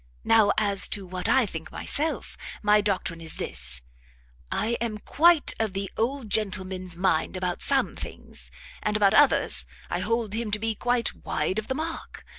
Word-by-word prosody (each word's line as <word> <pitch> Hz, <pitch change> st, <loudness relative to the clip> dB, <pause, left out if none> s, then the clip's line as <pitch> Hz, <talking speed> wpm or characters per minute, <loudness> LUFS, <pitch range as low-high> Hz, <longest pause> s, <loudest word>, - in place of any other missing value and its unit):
Now 220 Hz, -3 st, +5 dB
as 200 Hz, -2 st, +3 dB
to 200 Hz, -2 st, -3 dB
what 180 Hz, 0 st, -4 dB
I 265 Hz, -3 st, +4 dB
think 160 Hz, -5 st, -7 dB
myself, 310 Hz, +2 st, -2 dB, 0.3 s
my 210 Hz, 0 st, +5 dB
doctrine 185 Hz, -4 st, -1 dB
is 160 Hz, -1 st, -5 dB
this; 60 Hz, 0 st, -3 dB, 0.7 s
I 215 Hz, -, 0 dB
am 225 Hz, -2 st, -2 dB
quite 325 Hz, +8 st, +3 dB
of 220 Hz, -3 st, -1 dB
the 195 Hz, 0 st, -4 dB
old 240 Hz, -1 st, -2 dB
gentleman's 190 Hz, -4 st, -1 dB
mind 185 Hz, -1 st, +1 dB
about 180 Hz, -1 st, -2 dB
some 275 Hz, -1 st, +3 dB
things, -, -, -8 dB, 0.3 s
and 210 Hz, 0 st, 0 dB
about 200 Hz, -2 st, +4 dB
others 290 Hz, -2 st, +4 dB, 0.2 s
I -, -, 0 dB
hold 230 Hz, -3 st, -1 dB
him 225 Hz, 0 st, -2 dB
to 210 Hz, -, 0 dB
be 225 Hz, +1 st, -1 dB
quite 245 Hz, +1 st, 0 dB
wide 170 Hz, +7 st, -1 dB
of 215 Hz, -, -7 dB
the 260 Hz, -, -2 dB
mark. 320 Hz, +2 st, -6 dB
210 Hz, 170 wpm, -26 LUFS, 185-230 Hz, 0.7 s, Now